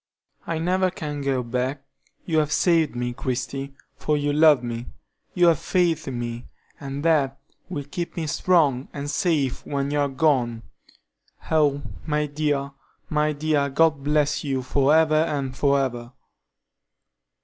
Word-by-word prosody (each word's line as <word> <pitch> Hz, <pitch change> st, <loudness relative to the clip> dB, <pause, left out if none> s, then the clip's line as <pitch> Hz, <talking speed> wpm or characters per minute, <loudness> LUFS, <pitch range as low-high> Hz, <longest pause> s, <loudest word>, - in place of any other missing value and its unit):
"I 165 Hz, -, -1 dB
never 185 Hz, +3 st, +1 dB
can 150 Hz, -5 st, -5 dB
go 135 Hz, -2 st, 0 dB
back; 125 Hz, +3 st, -2 dB, 0.4 s
you 160 Hz, -3 st, +2 dB
have 150 Hz, -1 st, 0 dB
saved 165 Hz, -2 st, +2 dB
me, 120 Hz, 0 st, -2 dB
Christie, 135 Hz, +2 st, -4 dB, 0.2 s
for 150 Hz, -1 st, 0 dB
you 145 Hz, 0 st, 0 dB
love 150 Hz, -4 st, +5 dB
me, 120 Hz, 0 st, -5 dB, 0.5 s
you 180 Hz, -, +4 dB
have 165 Hz, -4 st, +4 dB
faith 175 Hz, -4 st, 0 dB
in 130 Hz, -2 st, -3 dB
me, 120 Hz, 0 st, -5 dB, 0.3 s
and 140 Hz, +2 st, -5 dB
that 140 Hz, -5 st, +2 dB, 0.3 s
will 150 Hz, -6 st, -4 dB
keep 170 Hz, +6 st, -6 dB
me 165 Hz, -, -1 dB
strong 155 Hz, -5 st, +2 dB
and 145 Hz, 0 st, -4 dB
safe 145 Hz, -5 st, 0 dB
when 140 Hz, 0 st, -2 dB
you 145 Hz, -, 0 dB
are 145 Hz, -1 st, +1 dB
gone. 130 Hz, -5 st, +1 dB, 0.9 s
Oh, 145 Hz, -3 st, +2 dB, 0.2 s
my 150 Hz, 0 st, +1 dB
dear, 145 Hz, -1 st, -1 dB, 0.4 s
my 150 Hz, 0 st, +2 dB
dear, 145 Hz, -1 st, 0 dB
God 155 Hz, 0 st, +2 dB
bless 150 Hz, 0 st, +1 dB
you 135 Hz, -3 st, -2 dB
for 140 Hz, +2 st, +2 dB
ever 160 Hz, -1 st, +4 dB
and 145 Hz, -4 st, 0 dB
for 140 Hz, 0 st, +2 dB
ever!" 120 Hz, -2 st, -3 dB
145 Hz, 150 wpm, -24 LUFS, 135-155 Hz, 0.9 s, love